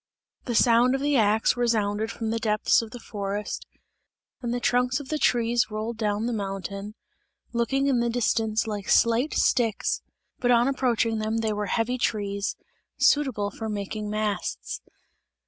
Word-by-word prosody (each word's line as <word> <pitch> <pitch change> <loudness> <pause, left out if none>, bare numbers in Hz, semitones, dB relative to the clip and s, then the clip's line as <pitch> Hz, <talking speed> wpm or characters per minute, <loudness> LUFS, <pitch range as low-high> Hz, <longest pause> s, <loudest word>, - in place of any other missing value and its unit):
The 240 - -2
sound 240 +3 +5
of 270 - -2
the 290 0 +1
axe 220 -2 +3
resounded 220 -3 0
from 225 -1 -3
the 230 - -1
depths 215 0 +2
of 225 - -7
the 245 - -8
forest, 205 -2 -4 0.7
and 240 -2 -2
the 245 - -1
trunks 250 +2 +1
of 275 -2 -9
the 310 - -1
trees 235 -3 +2
rolled 215 +2 -4
down 210 0 -1
the 240 - -1
mountain, 200 0 -5 0.6
looking 270 +4 +1
in 270 -3 +2
the 235 0 +1
distance 225 -2 +1
like 205 -3 -4
slight 235 +6 +3
sticks, 225 -5 +1 0.4
but 245 - 0
on 240 0 +5
approaching 235 -4 +1
them 215 +1 -1
they 220 -1 0
were 210 0 -2
heavy 240 +5 0
trees, 200 -3 -1 0.4
suitable 250 -9 +2
for 220 -1 -5
making 210 +1 -4
masts. 210 -1 -3
225 Hz, 160 wpm, -26 LUFS, 210-245 Hz, 0.7 s, sound